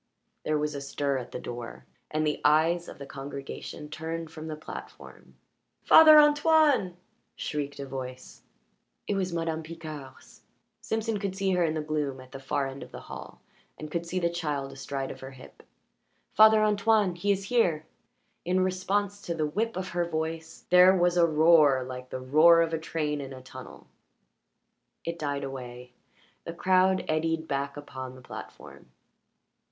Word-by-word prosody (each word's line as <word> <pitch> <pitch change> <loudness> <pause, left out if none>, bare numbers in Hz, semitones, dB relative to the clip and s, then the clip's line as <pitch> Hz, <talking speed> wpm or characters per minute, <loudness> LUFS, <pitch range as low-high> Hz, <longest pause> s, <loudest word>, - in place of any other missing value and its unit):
There 155 - 0
was 150 0 -2
a 140 - -5
stir 140 -1 -2
at 125 - -8
the - - -5
door, 120 -1 -8 0.2
and 155 0 -1
the 150 - -1
eyes 165 +3 +3
of - - -10
the 140 - -8
congregation 140 +2 -8
turned 160 +1 -5
from 160 -1 -8
the 155 - -4
platform. 155 - -11 0.5
"Father 310 -1 +9
Antoine!" 295 - +4 0.4
shrieked 145 -2 -4
a 140 - -4
voice. 130 -1 -8 0.6
It - - -1
was 190 -2 -1
Madame 165 -1 -2
Picard's; 155 -4 -10 0.4
Simpson 220 -1 -2
could 195 -2 -3
see 195 0 0
her 180 -1 +2
in 160 -1 0
the 155 - -2
gloom 150 -3 -2
at 130 0 -14
the 135 - -8
far 140 +1 -1
end 135 +1 -7
of - - -10
the - - -9
hall - - -10 0.4
and 155 -1 -8
could 170 +1 -3
see 185 - -3
the 170 -2 +1
child 150 -5 -3
astride 135 0 -5
of - - -10
her 130 - -8
hip. 135 -1 -15 0.7
"Father 220 0 +7
Antoine! 210 -2 +2
He 175 +4 0
is 195 0 0
here!" 170 -11 +2 0.6
In 185 +2 +1
response 195 +2 -1
to 170 - -4
the 155 -1 0
whip 215 +8 -2
of 185 0 -4
her 175 0 -1
voice 160 0 -5
there 180 +1 +7
was 175 0 +2
a 170 -1 +5
roar 155 -4 +5
like 125 0 -8
the 130 - -5
roar 160 +6 +6
of 165 0 -3
a 160 - 0
train 150 -2 -2
in 135 -1 -7
a 130 - -10
tunnel. 130 0 -11 1.2
It 170 0 -4
died 145 -2 -2
away; 125 -2 -8 0.5
the 165 - -6
crowd 185 +1 +3
eddied 160 +1 -1
back 140 +1 -3
upon 130 -3 -8
the 130 - -13
platform. 65 - -11
160 Hz, 170 wpm, -28 LUFS, 140-180 Hz, 1.2 s, Father